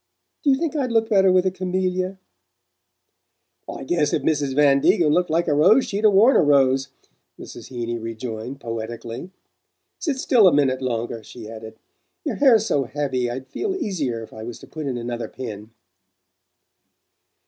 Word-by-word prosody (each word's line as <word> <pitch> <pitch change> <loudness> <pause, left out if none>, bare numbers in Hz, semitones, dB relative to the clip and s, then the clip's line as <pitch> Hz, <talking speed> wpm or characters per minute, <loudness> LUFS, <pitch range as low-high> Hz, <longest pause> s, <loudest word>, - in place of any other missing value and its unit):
Do 295 - +2
you 270 - +5
think 320 +1 -2
I'd 265 -5 -1
look 225 -1 +2
better 195 -3 +4
with 185 0 +3
a 185 - +2
camellia?" 185 0 -2 1.5
"I - - -6
guess 150 +1 0
if - - 0
Mrs. 145 -4 0
Van 140 -1 +5
Degen 170 +1 +3
looked 180 +2 +1
like 170 +2 +1
a 150 - +2
rose 190 - +5
she'd 205 0 -3
'a - - +8
worn 215 +6 +5
a - - +6
rose," 135 -3 +3 0.5
Mrs. - - -10
Heeny 120 -2 -4
rejoined 115 +3 -6
poetically. 115 +5 -6 0.7
"Sit 295 -6 -2
still 240 -6 +4
a - - +6
minute 135 -3 +2
longer," 120 -2 -3
she 110 0 -11
added. 110 0 -10 0.5
"Your - - -2
hair's 235 -7 +5
so 140 -10 0
heavy 130 -2 -2
I'd 130 +2 -5
feel 380 - -3
easier 155 - -3
if - - -13
I 110 - -9
was 115 +1 -7
to - - -13
put 155 -2 -6
in 130 -2 -2
another 120 0 -4
pin." 110 -4 -8
145 Hz, 170 wpm, -22 LUFS, 120-190 Hz, 1.5 s, a